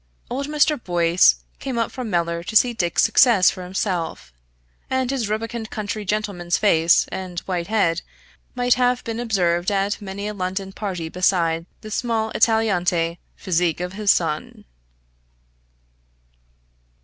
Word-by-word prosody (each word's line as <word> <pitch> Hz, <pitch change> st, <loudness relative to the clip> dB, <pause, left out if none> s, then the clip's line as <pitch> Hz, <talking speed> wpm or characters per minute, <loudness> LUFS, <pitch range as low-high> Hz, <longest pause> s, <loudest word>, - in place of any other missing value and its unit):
Old 275 Hz, +3 st, -2 dB
Mr. 300 Hz, -3 st, +1 dB
Boyce 175 Hz, 0 st, +3 dB, 0.2 s
came 265 Hz, -3 st, -4 dB
up 230 Hz, -, 0 dB
from 250 Hz, -4 st, -5 dB
Mellor 170 Hz, -2 st, 0 dB
to 220 Hz, -, -6 dB
see 240 Hz, +2 st, +5 dB
Dick's 175 Hz, -6 st, +1 dB
success 225 Hz, -8 st, +5 dB
for 185 Hz, -, -8 dB
himself, 180 Hz, -, -3 dB, 0.6 s
and 260 Hz, -1 st, 0 dB
his 245 Hz, -6 st, -2 dB
rubicund 225 Hz, +1 st, -3 dB
country 210 Hz, 0 st, -4 dB
gentleman's 195 Hz, -4 st, -1 dB
face 170 Hz, -5 st, +4 dB
and 185 Hz, -2 st, -5 dB
white 175 Hz, -3 st, -3 dB
head 180 Hz, -6 st, +1 dB, 0.5 s
might 245 Hz, 0 st, +3 dB
have 250 Hz, 0 st, +1 dB
been 230 Hz, 0 st, -4 dB
observed 180 Hz, -7 st, +1 dB
at 200 Hz, +1 st, -1 dB
many 200 Hz, +1 st, -5 dB
a 210 Hz, -, -4 dB
London 190 Hz, 0 st, -3 dB
party 185 Hz, -6 st, -4 dB
beside 170 Hz, -1 st, +1 dB
the 215 Hz, -1 st, -9 dB
small 225 Hz, -1 st, -1 dB
Italianate 180 Hz, -7 st, +1 dB, 0.2 s
physique 175 Hz, -4 st, 0 dB
of 180 Hz, +1 st, -4 dB
his 205 Hz, 0 st, -2 dB
son. 155 Hz, -5 st, 0 dB
195 Hz, 135 wpm, -22 LUFS, 175-225 Hz, 0.6 s, see